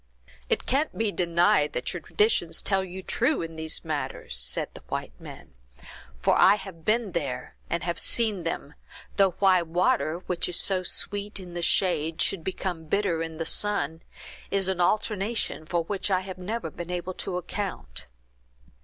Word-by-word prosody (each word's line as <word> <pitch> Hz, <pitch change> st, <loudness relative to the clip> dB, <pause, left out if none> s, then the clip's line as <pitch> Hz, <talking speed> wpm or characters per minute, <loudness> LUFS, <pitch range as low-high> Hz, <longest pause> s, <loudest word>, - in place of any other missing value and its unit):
"It -, -, +1 dB
can't 280 Hz, +4 st, +1 dB
be 220 Hz, -2 st, +1 dB
denied 170 Hz, -4 st, +3 dB
that 125 Hz, -, -2 dB
your 175 Hz, -, -5 dB
traditions 175 Hz, -4 st, +1 dB
tell 195 Hz, -1 st, +2 dB
you 190 Hz, 0 st, -7 dB
true 260 Hz, -, +1 dB
in 165 Hz, -, -5 dB
both 160 Hz, -, -11 dB
these 160 Hz, 0 st, -1 dB
matters," 150 Hz, -, -3 dB
said 65 Hz, 0 st, +1 dB
the -, -, -11 dB
white -, -, -3 dB
man; -, -, -11 dB, 0.6 s
"for -, -, +3 dB
I -, -, +8 dB
have 190 Hz, -5 st, -9 dB
been 215 Hz, 0 st, +2 dB
there, 140 Hz, -7 st, -3 dB
and 170 Hz, -, -1 dB
have 170 Hz, 0 st, -1 dB
seen 220 Hz, -5 st, +1 dB
them, 165 Hz, -3 st, -4 dB, 0.4 s
though 195 Hz, -3 st, +5 dB
why 190 Hz, -2 st, +5 dB
water, 170 Hz, +1 st, +1 dB
which 180 Hz, -1 st, -1 dB
is 175 Hz, -, +2 dB
so 190 Hz, -2 st, +2 dB
sweet 205 Hz, +3 st, -1 dB
in 180 Hz, -2 st, -9 dB
the 175 Hz, -, -3 dB
shade, 165 Hz, -2 st, +2 dB
should 190 Hz, -5 st, +1 dB
become 180 Hz, -3 st, -3 dB
bitter 175 Hz, -1 st, +1 dB
in 165 Hz, -1 st, -4 dB
the 165 Hz, -, -2 dB
sun, 165 Hz, -7 st, 0 dB, 0.5 s
is 195 Hz, -1 st, +2 dB
an 190 Hz, -2 st, +1 dB
alteration 205 Hz, -4 st, 0 dB
for 170 Hz, -1 st, +1 dB
which 195 Hz, +3 st, -1 dB
I 185 Hz, -1 st, +3 dB
have 185 Hz, -1 st, -8 dB
never 220 Hz, +6 st, -3 dB
been 175 Hz, 0 st, -7 dB
able 180 Hz, +1 st, -3 dB
to 180 Hz, 0 st, -3 dB
account." 180 Hz, -, -5 dB
180 Hz, 175 wpm, -27 LUFS, 165-200 Hz, 0.6 s, I